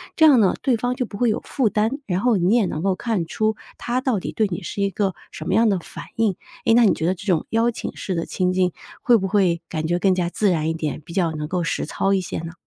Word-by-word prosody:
这 315 - +5
样 285 -6 +7
呢， 195 -4 +4
对 255 -3 +2
方 245 +2 -1
就 250 - -1
不 205 - -9
会 240 +2 +2
有 215 - -1
负 255 -7 0
担， 215 +2 +1
然 180 -2 -1
后 245 -4 +3
你 185 +5 +3
也 235 -4 +3
能 155 -3 -3
够 190 -1 +1
看 215 -5 -1
出 215 +6 0 0.2
他 245 +2 -1
到 240 -7 +1
底 - - -5
对 220 - +1
你 175 -3 -5
是 200 +3 -5
一 200 - +2
个 195 -1 0 0.2
什 - - -8
么 185 - 0
样 225 +1 +4
的 195 - +1
反 - - -9
应。 220 -5 +1 0.3
诶， 225 - +4
那 240 0 +6
你 - - +5
觉 160 - -3
得 185 - +1
这 190 - -11
种 175 -6 +1
邀 230 +1 +2
请 - - -6
式 190 - -4
的 165 - -2
情 180 -1 0
境， 185 -1 +2 0.3
会 240 -1 +5
不 195 -2 -2
会 185 -4 +2
感 160 -2 -3
觉 175 +1 +1
更 190 0 +3
加 175 -1 0
自 205 +3 +1
然 160 -2 0
一 - - 0
点， 155 -2 -4
比 170 - -12
较 175 -3 +1
能 150 -1 -4
够 180 0 -1
实 165 - -1
操 195 +5 0
一 190 - +2
些 - - -5
呢？ 165 0 -7
195 Hz, 315 characters per minute, -22 LUFS, 175-225 Hz, 0.3 s, 样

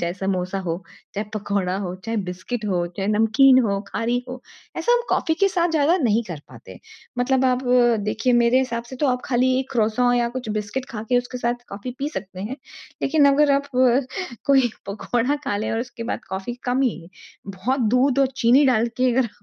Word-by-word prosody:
चाहे 170 0 -1
समोसा 190 -1 -2
हो। 170 -3 -2 0.4
चाहे 205 +2 -2
पकौड़ा 200 -3 -1
हो, 180 -3 -4
चाहे 225 0 -2
बिस्कुट 215 +6 -5
हो, 175 -3 0
चाहे 195 0 -2
नमकीन 225 +5 +5
हो, 200 -2 0
खारी 235 +3 -1
हो। 255 0 -7 0.4
ऐसा 480 - +1
हम 485 - +4
कॉफ़ी 320 - +1
के 395 - +5
साथ 350 -2 0
ज़्यादा 320 +2 +3
नहीं 225 +1 +2
कर 160 -4 -6
पाते। - - -13 0.4
मतलब 260 +1 +2
आप 255 +1 +1 0.4
देखिए। 225 +4 0
मेरे 240 +1 +4
हिसाब 235 -3 -2
से 260 - -7
तो 290 - 0
आप 250 0 0
खाली 255 0 +2
एक 265 0 -4
क्रॉसों 240 +2 +2
या 240 -1 +1
कुछ 250 -3 -5
बिस्कुट 210 +5 -3
खा 215 -3 -5
के 245 - +5
उसके 245 +1 -5
साथ 240 0 -2
कॉफ़ी 205 +6 -6
पी 285 - -2
सकते 190 - -7
हैं। 235 +7 -5 0.5
लेकिन 290 +1 +3
अगर 285 0 +4
आप 280 +1 +1 0.8
कोई 265 -3 +4 0.2
पकोड़ा 240 +7 -1
खा 205 -7 -1
ले 215 - -2
और 225 - -1
उसके 240 -1 -7
बाद - - -6
कॉफ़ी 190 +5 -4 0.2
कम 260 +2 +1
ही 185 -9 -2 0.5
बहुत 255 +7 0 0.2
दूध 270 +1 +2
और 270 - +3
चीनी 250 +5 +5
डाल 235 -2 +2
के 255 0 +2
अगर 250 -1 +1
240 Hz, 200 wpm, -22 LUFS, 205-260 Hz, 0.8 s, नमकीन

